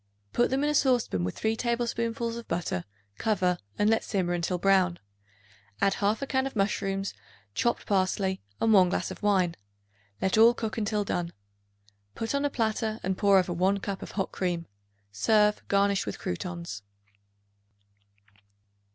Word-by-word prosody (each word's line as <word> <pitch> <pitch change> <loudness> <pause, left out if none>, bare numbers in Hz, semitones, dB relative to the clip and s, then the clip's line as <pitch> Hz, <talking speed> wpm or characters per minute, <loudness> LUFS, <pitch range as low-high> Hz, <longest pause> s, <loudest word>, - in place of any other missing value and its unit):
Put 240 - +3
them 270 +2 0
in 295 - +2
a - - -1
saucepan 245 - +2
with 90 - -3
3 220 0 0
tablespoonfuls 235 -1 -1
of 235 0 -8
butter; 125 - -2 0.3
cover 185 -5 +1 0.2
and 205 - +2
let 225 +1 +3
simmer 180 -4 -1
until 175 +1 -1
brown. 185 -1 +3 0.8
Add 195 - +3
1/2 215 +8 0
can 265 0 +1
of 270 - -8
mushrooms, 195 -1 -1 0.4
chopped 235 - 0
parsley, 190 -1 0 0.2
and 225 -1 +3
1 185 -3 +6
glass - - -2
of - - -9
wine; 190 -5 +2 0.7
let 190 +3 +1
all 230 +2 +7
cook 225 -1 -3
until 210 -1 0
done. 175 -3 -2 0.8
Put 225 +3 -3
on 280 +1 +1
a - - +2
platter 220 -3 -1
and 190 +1 0
pour 200 0 +4
over 180 -1 +1
1 190 +3 +2
cup 195 -1 -4
of - - -8
hot 195 -2 -2
cream. 175 -2 -2 0.5
Serve, 210 - +3
garnished 200 - +2
with 100 - -4
croutons. 170 - -5
200 Hz, 155 wpm, -28 LUFS, 185-225 Hz, 0.8 s, all